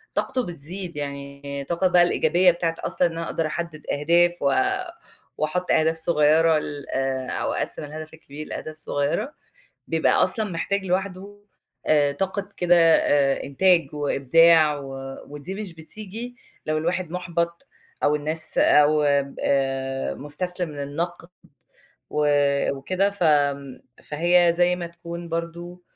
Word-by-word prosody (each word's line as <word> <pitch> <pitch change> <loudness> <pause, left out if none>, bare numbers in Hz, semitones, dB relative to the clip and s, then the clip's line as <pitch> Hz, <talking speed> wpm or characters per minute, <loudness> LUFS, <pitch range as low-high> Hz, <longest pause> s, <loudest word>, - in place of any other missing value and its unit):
طاقته 255 -2 -1
بتزيد، 170 +2 -6
يعني 140 0 -6
طاقة 170 +2 +2
بقى 175 -1 +5
الإيجابية 175 +1 +3
بتاعة 165 -1 -2
أصلًا 180 - +1
إن 165 -1 -7
أقدر 165 -1 -2
أحدِّد 165 -1 -5 0.2
أهداف 175 +3 +3
و - - +2 0.9
وأحُطّ 180 +4 -1
أهداف 160 +1 +3
صغيّرة 160 0 +3
ل 145 -1 -6 0.4
أو - - -2
أقسِّم - - -3
الهَدَف 155 +2 -8
الكبير 155 -1 -10
لأهداف 155 - -6
صغيّرة، 155 - -2 0.5
بيبقى - - +2
أصلًا 215 -4 -2
محتاج 190 +3 -2
لوحدُه 195 +2 -3 0.5
آآ، 145 -2 +4
طاقة 195 +5 -3
كده 175 0 +4
آآ، 145 -4 +3
إنتاج 165 +1 +2
وإبداع 150 +2 +4
و 135 -1 -8 0.3
ودي 145 +6 -7
مش 200 -4 -6
بتيجي 215 +8 -8 0.3
لو 155 0 0
الواحد 170 +1 -2
مُحبَط 170 -1 -3 0.4
أو 145 - +3
الناس 155 +2 +1
أو 150 +1 +5 0.4
آآ، 135 -1 -1
مستسلم 175 +3 -3
للنقد 165 +5 -5 0.8
و 150 0 +1 0.5
وكده، 185 +9 0
ف 200 -2 -7
امم، 140 -3 +1 0.2
فهي 170 +3 +3
زي 180 0 +3
ما 175 -1 -5
تكون 170 0 -8
برضه، 170 +2 -5
165 Hz, 125 wpm, -24 LUFS, 145-180 Hz, 0.9 s, بقى